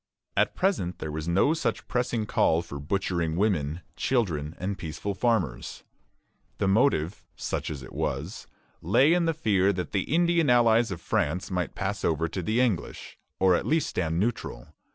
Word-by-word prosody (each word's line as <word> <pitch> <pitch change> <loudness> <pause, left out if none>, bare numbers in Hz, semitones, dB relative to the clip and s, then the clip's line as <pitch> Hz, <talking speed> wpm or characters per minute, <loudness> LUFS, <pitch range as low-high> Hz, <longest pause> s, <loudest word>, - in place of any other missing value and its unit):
At - - +2
present 95 - 0
there 80 - -5
was 80 +1 -4
no 95 - +3
such 165 - -2
pressing 120 -3 -1
call 85 -5 +2
for 70 -4 -7
butchering 85 0 -1
women, 85 -5 0
children, 85 - -1
and 100 +2 -3
peaceful 95 +4 -4
farmers. 105 - -1 0.7
The 100 - 0
motive, 95 - +2
such - - -3
as 70 -3 -6
it - - -11
was, - - -3 0.3
lay 145 +5 +4
in 175 -1 +2
the 165 -1 +1
fear 100 - +2
that 90 -3 -4
the 100 +4 -2
Indian 170 -2 +3
allies 120 -1 +4
of 90 -3 -5
France 85 +6 -1
might 90 -1 -2
pass 100 +1 -3
over 80 +1 +1
to 90 +3 -4
the 110 +7 0
English, 115 -9 -1 0.2
or 95 -1 +5
at - - 0
least 160 0 +1
stand 85 -1 -1
neutral. 100 - -3
95 Hz, 170 wpm, -27 LUFS, 85-120 Hz, 0.7 s, or